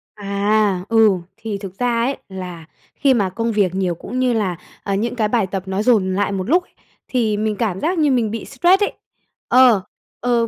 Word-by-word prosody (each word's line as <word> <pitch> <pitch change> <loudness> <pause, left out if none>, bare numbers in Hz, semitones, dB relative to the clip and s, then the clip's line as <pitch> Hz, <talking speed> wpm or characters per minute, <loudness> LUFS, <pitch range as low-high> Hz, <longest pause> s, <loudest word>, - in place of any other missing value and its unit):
À, 200 -1 +1
ừ, 225 -2 +5 0.3
thì 220 -2 -4
thực 195 0 -9
ra 245 -1 +1
ấy, 270 +3 -1
là 180 -4 -7 0.3
khi 275 -2 +3
mà 200 -6 +1
công 230 +5 -2
việc 195 -4 +1
nhiều 185 -3 0
cũng 255 +9 -5
như 250 -2 +2
là, 195 -6 0 0.3
à, 195 -1 -1
những 235 +4 -1
cái 215 -3 +1
bài 215 -4 +1
tập 190 -1 -4
nó 190 +2 -2
dồn 200 -6 +2
lại 200 0 0
một 190 +3 -3
lúc, 355 +3 +4 0.4
thì 220 -5 0
mình 215 0 -1
cảm 200 -5 -1
giác 345 +3 0
như 300 -3 +3
mình 230 -4 +1
bị 225 - -5
stress 355 +9 +3
ấy. - - -1 0.5
Ờ, 250 -6 +6 0.4
ờ, 235 -1 +1
215 Hz, 205 wpm, -20 LUFS, 195-245 Hz, 0.5 s, Ờ